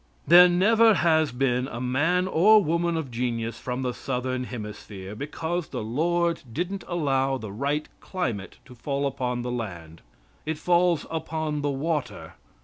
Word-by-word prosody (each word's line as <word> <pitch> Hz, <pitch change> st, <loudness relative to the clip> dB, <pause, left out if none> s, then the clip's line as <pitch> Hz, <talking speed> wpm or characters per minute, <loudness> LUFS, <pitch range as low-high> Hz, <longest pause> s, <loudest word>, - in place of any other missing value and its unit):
There 175 Hz, +3 st, +8 dB
never 220 Hz, +5 st, +5 dB
has 160 Hz, -4 st, +3 dB
been 125 Hz, 0 st, 0 dB
a 120 Hz, -, -6 dB
man 160 Hz, +9 st, +1 dB
or 205 Hz, +5 st, +5 dB
woman 170 Hz, +1 st, 0 dB
of 145 Hz, -6 st, -4 dB
genius 115 Hz, -1 st, -3 dB
from 125 Hz, +1 st, -4 dB
the 125 Hz, -1 st, -1 dB
southern 130 Hz, -1 st, -3 dB
hemisphere, 105 Hz, -4 st, -8 dB
because 160 Hz, +6 st, -4 dB
the -, -, -5 dB
Lord 170 Hz, +8 st, 0 dB
didn't 180 Hz, -, -3 dB
allow 135 Hz, -6 st, 0 dB
the 110 Hz, -5 st, -7 dB
right 140 Hz, +8 st, -2 dB
climate 120 Hz, -, -4 dB
to 125 Hz, -, -13 dB
fall 140 Hz, +3 st, -3 dB
upon 125 Hz, -3 st, -2 dB
the 125 Hz, -, -3 dB
land. 85 Hz, -9 st, -6 dB, 0.4 s
It 155 Hz, 0 st, -3 dB
falls 175 Hz, 0 st, +2 dB
upon 160 Hz, -2 st, -3 dB
the 145 Hz, -, 0 dB
water. 150 Hz, +2 st, -3 dB
140 Hz, 150 wpm, -25 LUFS, 125-170 Hz, 0.4 s, There